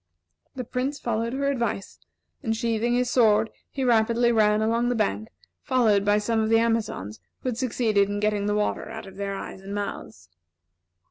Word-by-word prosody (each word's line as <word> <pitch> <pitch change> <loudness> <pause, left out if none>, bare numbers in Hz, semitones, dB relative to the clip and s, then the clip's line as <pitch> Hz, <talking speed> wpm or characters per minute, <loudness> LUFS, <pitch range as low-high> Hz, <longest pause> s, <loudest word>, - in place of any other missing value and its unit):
The 255 - -4
Prince 260 +4 -2
followed 230 -1 -2
her 275 +1 -1
advice, 235 -7 -3 0.4
and 225 -1 -1
sheathing 230 +1 0
his 250 0 +1
sword 220 -2 +4 0.2
he 270 - -3
rapidly 235 0 +3
ran 210 -2 +3
along 230 +2 +1
the 245 - 0
bank, 105 - -1 0.3
followed 220 -6 +3
by 205 +1 +3
some 220 +2 0
of 220 0 +1
the 225 - +5
Amazons 225 - -1 0.2
who 255 - -2
had 235 - -3
succeeded 220 -5 +1
in 205 0 -2
getting 210 -1 0
the 210 - +1
water 210 0 -1
out 220 -1 -7
of 195 -1 -12
their 200 0 -3
eyes 190 - -7
and 200 +1 -6
mouths. 110 - -6
220 Hz, 185 wpm, -25 LUFS, 205-235 Hz, 0.4 s, the